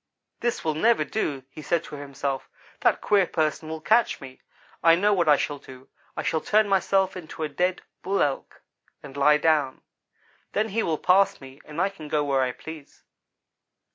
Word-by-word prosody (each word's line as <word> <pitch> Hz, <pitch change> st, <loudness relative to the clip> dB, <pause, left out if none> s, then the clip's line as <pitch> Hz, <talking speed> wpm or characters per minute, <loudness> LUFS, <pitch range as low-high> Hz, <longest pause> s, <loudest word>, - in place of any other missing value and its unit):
"'This 240 Hz, -1 st, -1 dB
will 155 Hz, -, +1 dB
never 225 Hz, +10 st, +2 dB
do,' 145 Hz, -11 st, -2 dB
he 155 Hz, -, -10 dB
said 170 Hz, +2 st, 0 dB
to -, -, -12 dB
himself. 140 Hz, -1 st, -4 dB, 0.3 s
'That -, -, +2 dB
queer 200 Hz, -3 st, +3 dB
person 155 Hz, 0 st, -1 dB
will 160 Hz, 0 st, -4 dB
catch 220 Hz, +8 st, +2 dB
me. 130 Hz, -1 st, -12 dB, 0.4 s
I 165 Hz, 0 st, +6 dB
know 205 Hz, +4 st, +3 dB
what 175 Hz, -5 st, +2 dB
I 145 Hz, -, +7 dB
shall 145 Hz, 0 st, -3 dB
do; 130 Hz, 0 st, -14 dB, 0.3 s
I -, -, -2 dB
shall 160 Hz, -, 0 dB
turn 215 Hz, 0 st, +3 dB
myself 190 Hz, -1 st, +2 dB
into 160 Hz, -3 st, -7 dB
a -, -, 0 dB
dead 180 Hz, +5 st, -1 dB, 0.2 s
Bull 195 Hz, +1 st, +1 dB
Elk 140 Hz, -2 st, -4 dB, 0.4 s
and 140 Hz, -2 st, -11 dB
lie 150 Hz, +1 st, +5 dB
down. 150 Hz, -4 st, +1 dB, 0.7 s
Then 215 Hz, +1 st, 0 dB
he 225 Hz, +3 st, 0 dB
will 160 Hz, -6 st, 0 dB
pass 190 Hz, +4 st, +3 dB
me 135 Hz, +1 st, -13 dB
and 150 Hz, +2 st, -7 dB
I 190 Hz, +2 st, +2 dB
can 165 Hz, -6 st, -11 dB
go 150 Hz, 0 st, 0 dB
where 135 Hz, -2 st, +1 dB
I 130 Hz, -1 st, +1 dB
please.' 155 Hz, +2 st, -11 dB
160 Hz, 190 wpm, -25 LUFS, 145-190 Hz, 0.7 s, I